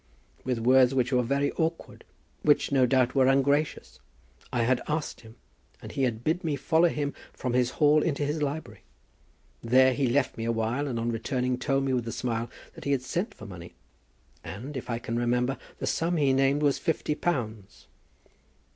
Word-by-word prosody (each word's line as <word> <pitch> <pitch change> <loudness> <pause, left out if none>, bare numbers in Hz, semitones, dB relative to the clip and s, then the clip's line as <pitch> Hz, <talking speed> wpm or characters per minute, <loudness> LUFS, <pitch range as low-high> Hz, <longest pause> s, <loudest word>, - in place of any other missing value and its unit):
With 125 -2 -1
words 130 +2 +4
which 130 0 +1
were 125 - +4
very 140 +4 0
awkward, 160 0 -3 0.4
which 145 -1 +3
no 130 -2 +4
doubt 130 -1 +2
were 130 -2 +4
ungracious 140 +3 +1 0.5
I 120 -2 +1
had 125 +1 +2
asked 150 0 -3
him, 110 -1 -15 0.4
and - - -9
he - - -3
had 115 -2 -3
bid 165 +6 0
me 155 -3 0
follow 160 +5 +3
him 145 -2 -2 0.2
from 125 -2 -3
his 125 -1 +2
hall 150 0 +5
into 145 -2 0
his 150 +2 -2
library. 145 +2 -4 0.8
There 130 +2 +4
he 135 0 0
left 130 +1 +1
me 115 - -2
awhile, 115 +5 -1
and 120 -4 -2
on 115 +1 -1
returning 125 +2 -1
told 135 +1 0
me 135 -1 0
with 120 -2 -1
a - - -2
smile 115 -1 -2 0.2
that - - -11
he 140 - +2
had 130 -2 -1
sent 175 - -3
for 110 - -11
money, 90 -3 -10 0.7
and, 110 - -7
if 125 -1 -6
I 115 - -1
can 115 0 -4
remember, 125 +2 +1 0.2
the - - -4
sum 170 +1 0
he 140 -3 +3
named 135 +2 +2
was 145 -2 +2
fifty 160 -3 -1
pounds." 110 - -3
130 Hz, 190 wpm, -27 LUFS, 120-145 Hz, 0.8 s, hall